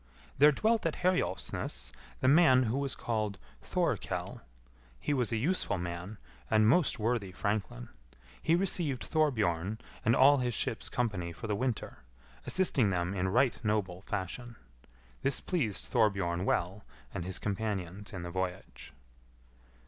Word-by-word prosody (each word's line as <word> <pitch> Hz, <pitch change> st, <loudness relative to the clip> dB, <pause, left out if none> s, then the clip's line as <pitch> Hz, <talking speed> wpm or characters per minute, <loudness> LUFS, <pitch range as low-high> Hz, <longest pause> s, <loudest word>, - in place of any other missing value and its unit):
There 150 Hz, +2 st, +8 dB
dwelt 220 Hz, +5 st, +1 dB
at 160 Hz, -, -2 dB
Herjolfsnes 95 Hz, -, -1 dB, 0.3 s
the 130 Hz, -, +2 dB
man 135 Hz, -3 st, +6 dB
who 120 Hz, +2 st, -1 dB
was 140 Hz, -2 st, -1 dB
called 110 Hz, -4 st, -2 dB, 0.2 s
Thorkell. -, -, -2 dB, 0.6 s
He 145 Hz, -, -1 dB
was 125 Hz, -4 st, +1 dB
a 115 Hz, -, +1 dB
useful 150 Hz, -, 0 dB
man 90 Hz, +3 st, -5 dB, 0.3 s
and 110 Hz, 0 st, +4 dB
most 145 Hz, +5 st, +3 dB
worthy 110 Hz, -3 st, -1 dB
franklin. 100 Hz, -, -3 dB, 0.5 s
He 165 Hz, -, +3 dB
received 170 Hz, -8 st, 0 dB
Thorbjorn 110 Hz, -, +1 dB, 0.3 s
and 115 Hz, +2 st, +4 dB
all 140 Hz, +2 st, +7 dB
his 120 Hz, -2 st, -1 dB
ship's 115 Hz, -, -1 dB
company 100 Hz, -8 st, -2 dB
for 85 Hz, -, -8 dB
the 105 Hz, -2 st, 0 dB
winter, 125 Hz, 0 st, -3 dB, 0.5 s
assisting 150 Hz, -, +3 dB
them 90 Hz, 0 st, -1 dB
in 95 Hz, -1 st, 0 dB
right 125 Hz, +4 st, +2 dB
noble 100 Hz, -4 st, -1 dB
fashion. 105 Hz, +5 st, -5 dB, 0.7 s
This 135 Hz, -1 st, +2 dB
pleased 135 Hz, -, -1 dB
Thorbjorn 95 Hz, -6 st, +1 dB
well 95 Hz, +2 st, -1 dB, 0.3 s
and 90 Hz, -, -3 dB
his 95 Hz, +1 st, -1 dB
companions 100 Hz, -2 st, -3 dB
in 95 Hz, -3 st, -6 dB
the 85 Hz, -, -5 dB
voyage. 95 Hz, -5 st, -5 dB
110 Hz, 140 wpm, -31 LUFS, 95-130 Hz, 0.7 s, There